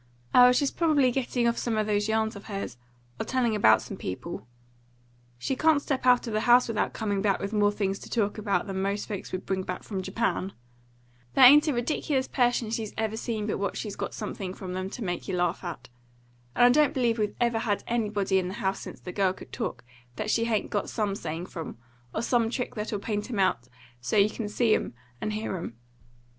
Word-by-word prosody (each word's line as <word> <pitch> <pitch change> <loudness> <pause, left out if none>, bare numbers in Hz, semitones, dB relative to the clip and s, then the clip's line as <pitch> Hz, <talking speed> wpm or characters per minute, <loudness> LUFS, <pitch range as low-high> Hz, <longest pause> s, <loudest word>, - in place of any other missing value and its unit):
"Oh, 250 0 +8
she's 275 +2 +2
probably 295 -6 +3
getting 245 -1 0
off 235 - +1
some 230 -2 -1
of 215 - +1
those 210 0 0
yarns 220 0 +1
of 200 - -10
hers, 195 - -5 0.4
or - - 0
telling 245 -4 +1
about 110 - +5
some - - -7
people. 95 +3 -6 0.9
She 130 - -2
can't 310 +2 +4
step 270 -3 -2
out 250 -1 +5
of 230 - -4
the 215 - +2
house 245 +2 +5
without 225 -2 0
coming 205 -3 -2
back 200 -1 +2
with 200 +2 -4
more 205 -1 +3
things 195 -1 -2
to - - -11
talk 215 -2 0
about 205 -2 0
than 190 -1 -3
most 200 +1 -1
folks 205 -3 -5
would 185 - -4
bring 190 -1 -1
back 180 -1 -5
from 195 -3 -4
Japan. 195 0 -1 0.8
There 260 - +9
ain't 295 +5 +8
a 300 - +2
ridiculous 260 +2 0
person 245 -3 +1
she's 225 -2 -3
ever 220 -1 -1
seen 220 -2 -3
but 210 - -2
what 200 -1 -2
she's 210 -3 -4
got - - -4
something 195 -3 -5
from 185 -1 -6
them 185 +1 -3
to 230 - -6
make 180 -2 -3
you 190 - -1
laugh 175 +1 0
at; 165 -8 -6 0.7
and 245 - +6
I - - +8
don't 300 +1 +1
believe 240 -3 +1
we've 210 -1 -1
ever 235 -2 +2
had 210 -3 -1
anybody 205 -4 +1
in 180 - -2
the 185 - -5
house 195 -4 -1
since - - -9
the 180 - -7
girl 190 -1 +1
could - - -13
talk - - -4 0.3
that 215 - -2
she 230 - +2
hain't 220 -3 -1
got 205 - -1
some 210 -3 -1
saying 165 -2 -4
from, 165 -7 -7 0.3
or 220 - -2
some 235 -2 +2
trick 250 +1 -3
that'll 210 -1 -3
paint 210 +2 -3
'em 235 - -3
out 155 -11 +1 0.3
so't 125 - +3
you 210 - 0
can 215 -2 -4
see 225 +1 +2
'em - - -1 0.3
and 215 - -2
hear 215 -2 -3
'em. 140 -9 -6
215 Hz, 225 wpm, -27 LUFS, 195-235 Hz, 0.9 s, There